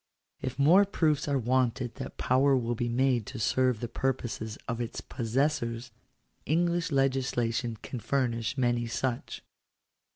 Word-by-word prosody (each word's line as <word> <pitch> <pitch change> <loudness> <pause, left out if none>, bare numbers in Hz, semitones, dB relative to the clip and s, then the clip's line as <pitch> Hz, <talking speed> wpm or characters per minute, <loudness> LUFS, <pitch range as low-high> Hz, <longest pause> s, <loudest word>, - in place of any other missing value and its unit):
If 130 -1 -4
more 165 +8 +6
proofs 155 -8 +1
are 140 -1 +2
wanted 125 -1 0
that - - -7
power 135 +2 +3
will 120 -1 -1
be 120 +1 -2
made 125 -2 +1
to 130 - -6
serve 125 +1 +2
the 120 - -2
purposes 120 -3 -3
of 115 0 -2
its 120 - -4
possessors, 120 -1 -1 0.5
English 170 +2 +1
legislation 125 -3 0
can 125 - -5
furnish 120 -1 -1
many 120 -2 +1
such. 120 +1 -3
125 Hz, 135 wpm, -29 LUFS, 120-135 Hz, 0.5 s, more